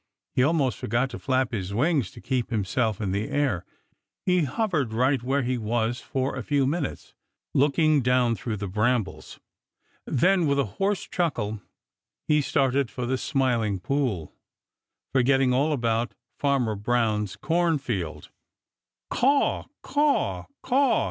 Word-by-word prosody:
He - - +2
almost 140 -2 +2
forgot 120 +4 0
to 120 - -6
flap 130 -2 0
his 100 -3 -3
wings 140 - +2
to 115 - -13
keep 130 -3 -1
himself 110 0 0
in 100 -4 -2
the 100 +3 -2
air. 130 -12 0 0.6
He 180 -3 +3
hovered 155 - -1
right 130 +2 +2
where 135 +3 0
he 125 0 -1
was 115 +2 -1
for 130 0 -2
a 130 - -3
few 140 +3 +1
minutes, 140 - -3 0.4
looking 150 +1 +3
down 125 -1 +3
through 115 -1 -4
the 100 0 -4
brambles. 110 +3 -1 0.7
Then 180 +4 +3
with 140 0 +2
a 140 - +3 0.2
hoarse 200 0 +1
chuckle, 110 - -2 0.7
he 150 0 +4
started 135 -1 +1
for 125 - -4
the 130 +2 0
Smiling 120 -8 0
Pool, 115 - -1 0.8
forgetting 135 0 +3
all 140 +5 +2
about 115 -4 0 0.2
Farmer 135 -6 +1
Brown's 105 -2 0
cornfield. 140 - -1 0.8
"Caw, 275 +3 +2 0.2
caw, 290 0 +1 0.2
caw!" 265 0 +3
130 Hz, 135 wpm, -26 LUFS, 115-145 Hz, 0.8 s, he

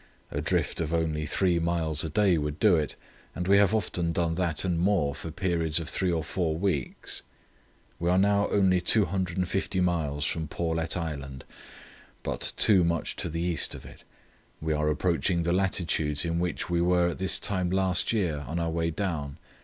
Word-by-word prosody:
A - - -2
drift - - 0
of 80 0 -1
only 80 -2 -1
three 90 +1 +1
miles 80 -2 0
a 80 - -3
day 95 +2 +3
would 75 0 -3
do 105 -5 +5
it, 75 -4 -1 0.4
and 90 +1 -3
we 100 +1 +6
have 100 +1 +4
often 85 -5 -1
done 85 -1 0
that 85 -1 0
and 90 -3 0
more 90 -6 +2
for 80 - -7
periods 85 -2 0
of 80 - -6
three 95 +1 0
or 80 -2 -1
four 80 -1 -2
weeks. 85 -8 -2 0.8
"We 85 +1 0
are 90 - +3
now 100 +1 +3
only 95 -3 +3
250 95 -1 0
miles 80 -5 0
from 80 +1 -2
Paulet 80 +2 -2
Island, 70 -6 -5 0.8
but - - -1
too 95 -4 +6
much 85 -1 -1
to - - -3
the 85 +1 -3
east 85 -2 0
of - - -11
it. - - -13 0.6
We 80 0 -1
are 75 0 +1
approaching 85 +2 +1
the 85 +1 0
latitudes 85 -5 0
in 85 0 -1
which 90 0 -2
we 85 -1 0
were 90 0 +3
at 85 - -6
this 95 0 +3
time 95 -3 -1
last 95 -1 +1
year, 90 -10 0
on 80 - -3
our 85 -1 -1
way 85 0 0
down. 80 -6 -3
85 Hz, 185 wpm, -27 LUFS, 80-90 Hz, 0.8 s, we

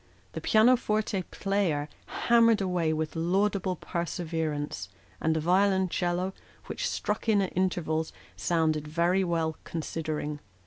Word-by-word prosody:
The - - -6
pianoforte 215 -3 +3
player 190 -8 0 0.4
hammered 230 -2 +5
away 180 -4 0
with 155 +1 -2
laudable 185 +2 +1
perseverance; 160 - -3 0.3
and 160 0 +2
the - - +1
violoncello, 185 0 +1 0.3
which - - -2
struck 210 +2 -2
in 210 -2 +5
at 190 -2 -1
intervals, 165 -4 0
" - - -26
sounded 155 -3 0
very 170 +5 +2
well, 165 -3 -1
considering." 155 -2 -4
175 Hz, 120 wpm, -28 LUFS, 160-195 Hz, 0.4 s, hammered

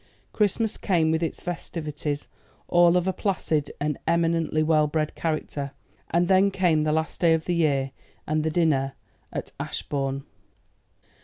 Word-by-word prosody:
Christmas 215 +1 +1
came 165 -5 +2
with 160 +1 +1
its 165 - -3
festivities, 150 -4 -4 0.4
all 175 0 +5
of 180 +1 0
a 190 - +1
placid 165 -8 -1
and 150 0 -1
eminently 165 -2 +2
well 155 -1 +3
bred 155 0 -1
character, 150 -3 -3 0.4
and 175 +1 +2
then 190 +1 +5
came 180 -5 +2
the 155 0 +1
last 160 +1 -1
day 165 -2 +5
of 160 - -4
the 175 - 0
year 140 -5 +1 0.3
and 155 0 0
the 160 - +1
dinner 150 -5 +1 0.4
at - - -5
Ashbourne. 135 -1 -3
160 Hz, 150 wpm, -25 LUFS, 150-175 Hz, 0.4 s, all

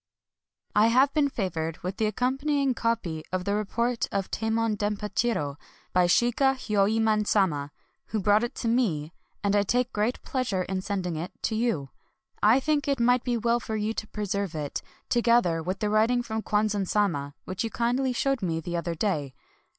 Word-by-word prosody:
I 210 +2 +6
have 260 +4 +4
been 295 -2 +3
favored 165 - -3
with 185 +2 -4
the 220 - +1
accompanying 270 +5 0
copy 220 -10 -1
of 185 0 -2
the 200 - 0
report 230 +3 0
of 195 -1 -2
Tamon 225 0 0
Dempachiro 205 -6 -1 0.4
by 180 -1 +4
Shiga 245 +7 +3
Hyoemon 215 -2 +1
Sama, 150 -9 +1 0.4
who 220 - -2
brought 205 +3 +3
it 240 - -3
to - - -3
me; 180 -10 0 0.3
and 200 0 +2
I 205 - +5
take 245 +5 0
great 215 +4 0
pleasure 230 -9 -1
in 185 0 -3
sending 185 -4 -2
it 170 +3 -4
to - - 0
you. 215 - -1 0.5
I 220 +5 +6
think 295 +1 0
that 280 - +2
it 270 - -6
might 245 +1 +3
be 245 -2 0
well 235 +1 +1
for 220 -2 -4
you 215 +1 -1
to 220 - -5
pre 210 -1 -4
serve 200 -3 -2
it, 150 -2 -3 0.3
together 235 -9 +3
with 185 +4 -4
the 210 - +1
writing 230 +3 +3
from 220 -2 -3
Kwan 210 0 +1
zan 200 -2 -1
Sama, 150 -10 0
which 185 +5 -3
you 225 - -2
kindly 245 +3 0
showed 270 0 0
me 165 -3 -1
the 175 +2 -4
other 170 0 -2
day. 155 -8 -1
215 Hz, 190 wpm, -27 LUFS, 185-240 Hz, 0.5 s, I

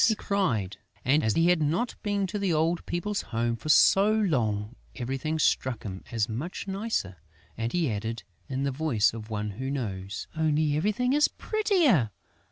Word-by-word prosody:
he 220 - +3
cried. 130 - -1 0.3
And, 145 +4 +3
as 110 - +1
he 165 +1 +4
had 180 -3 +3
not 165 +11 0
been 205 -2 0
to 190 +3 -3
the 195 -3 0
old 165 +2 +1
people's 200 +4 -2
home 115 0 -1
for 115 +7 -7
so 195 +6 +6
long, 120 - 0 0.2
everything 135 +5 -2
struck 130 -5 +1
him 95 -2 -6
as 115 -3 0
much 140 - -5
nicer; 195 - -2 0.4
and 115 +1 -2
he 165 -8 +1
added, 110 +2 -4 0.3
in 135 0 -2
the 140 - 0
voice 130 -8 +1
of 110 -1 -8
one 105 -1 -3
who 130 +7 -5
knows, 100 -8 -4
"Only 155 -1 +1
everything 215 - +1
is 295 +1 +5
prettier!... 350 - +2
150 Hz, 175 wpm, -27 LUFS, -, 0.4 s, so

